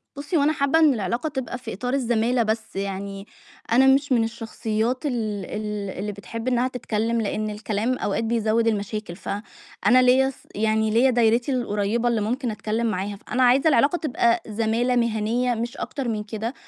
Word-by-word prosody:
بُصي 290 Hz, +4 st, -2 dB
هو 285 Hz, -, +3 dB
أنا 305 Hz, +2 st, +3 dB
حابة 280 Hz, +3 st, +2 dB
إن 305 Hz, -4 st, +5 dB
العلاقة 235 Hz, -, -2 dB
تبقى 265 Hz, -2 st, -4 dB
في 245 Hz, -2 st, -7 dB
إطار 250 Hz, +6 st, -3 dB
الزمَالة 240 Hz, -2 st, +1 dB
بس 220 Hz, -1 st, -3 dB
يعني، 195 Hz, +1 st, -4 dB, 0.4 s
أنا 265 Hz, +3 st, +5 dB
مش 275 Hz, +1 st, +3 dB
من 235 Hz, -3 st, +4 dB
الشخصيات 225 Hz, +2 st, -2 dB
ال 290 Hz, -, +1 dB, 0.3 s
ال 210 Hz, -2 st, -4 dB
اللي 210 Hz, +1 st, -3 dB
بتحب 210 Hz, +4 st, -7 dB
إنها 250 Hz, 0 st, +2 dB
تتكلم 230 Hz, -2 st, -1 dB
لإن 215 Hz, 0 st, -2 dB
الكلام 215 Hz, +3 st, -2 dB
أوقات 205 Hz, +3 st, -1 dB
بيزود 225 Hz, 0 st, +1 dB
المشاكل، 210 Hz, -3 st, -2 dB
ف -, -, -9 dB, 0.6 s
أنا 255 Hz, +3 st, +7 dB
ليّا 260 Hz, +2 st, +4 dB
ص 270 Hz, -, -9 dB, 0.2 s
يعني 220 Hz, +1 st, +1 dB
ليّا 245 Hz, +4 st, +4 dB
دايرتي 235 Hz, +2 st, +2 dB
القُريبة 230 Hz, 0 st, 0 dB
اللي 230 Hz, -3 st, +1 dB
ممكن 240 Hz, +2 st, -1 dB
أتكلم 220 Hz, +2 st, -2 dB
معاها، 200 Hz, 0 st, -2 dB
فأنا 250 Hz, +5 st, -1 dB
عايزة 260 Hz, +5 st, +4 dB
العلاقة 285 Hz, +5 st, +3 dB
تبقى 235 Hz, -6 st, +1 dB
زمَالة 230 Hz, +3 st, 0 dB
مهنية 235 Hz, +1 st, +1 dB
مش 235 Hz, +4 st, -4 dB
أكتر 270 Hz, -4 st, -4 dB
من 215 Hz, -2 st, -2 dB
كده. 220 Hz, +3 st, -4 dB
230 Hz, 175 wpm, -24 LUFS, 215-250 Hz, 0.6 s, أنا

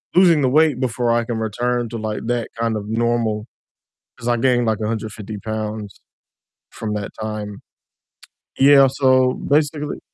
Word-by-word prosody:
losing 170 Hz, -5 st, +5 dB
the 130 Hz, -, +3 dB
weight 150 Hz, -2 st, +3 dB
before 120 Hz, -2 st, 0 dB
I 115 Hz, 0 st, +1 dB
can 115 Hz, -1 st, -3 dB
return 120 Hz, +2 st, -1 dB
to, 115 Hz, -, -5 dB
like, 110 Hz, -1 st, -4 dB
that 120 Hz, -1 st, -1 dB
kind 115 Hz, -2 st, 0 dB
of 105 Hz, 0 st, -6 dB
normal, 115 Hz, -1 st, 0 dB, 0.7 s
'cause 120 Hz, -, -6 dB
I 120 Hz, -, +3 dB
gained, 120 Hz, -1 st, +2 dB
like, 110 Hz, -2 st, +1 dB
150 110 Hz, -1 st, -4 dB
pounds 110 Hz, -2 st, -5 dB, 0.7 s
from 105 Hz, -2 st, -5 dB
that 100 Hz, -1 st, -4 dB
time. 105 Hz, -2 st, -5 dB, 1.0 s
Yeah, 135 Hz, 0 st, +7 dB
so 130 Hz, -2 st, +3 dB
basically 150 Hz, 0 st, -1 dB
115 Hz, 150 wpm, -20 LUFS, 110-130 Hz, 1.0 s, Yeah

